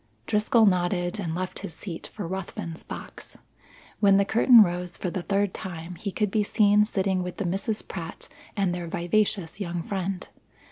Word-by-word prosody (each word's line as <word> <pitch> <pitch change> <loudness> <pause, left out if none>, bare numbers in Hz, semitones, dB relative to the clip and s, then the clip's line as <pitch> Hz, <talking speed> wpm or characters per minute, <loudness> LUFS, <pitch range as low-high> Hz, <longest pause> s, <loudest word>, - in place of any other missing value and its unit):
Driscoll 220 - +3
nodded 180 0 +1
and 165 -4 -2
left 185 +1 -4
his 160 - -7
seat 170 -5 -6
for 205 -6 -5
Ruthven's 175 -2 -5
box. - - -9 0.6
When 200 -2 +6
the 200 - +3
curtain 230 +1 +7
rose 175 -1 -3
for 180 - -3
the 185 - -3
third 200 +1 0
time 175 -1 -6
he 195 +4 -5
could 210 0 0
be 215 - +2
seen 210 0 +4
sitting 190 -3 0
with 180 0 -5
the 200 - -2
Misses 195 +5 -1
Pratt 165 -3 -7 0.3
and 195 -3 +1
their 175 -1 -4
vivacious 185 +1 0
young 175 -3 -3
friend. 190 -1 -3
190 Hz, 175 wpm, -26 LUFS, 175-205 Hz, 0.6 s, curtain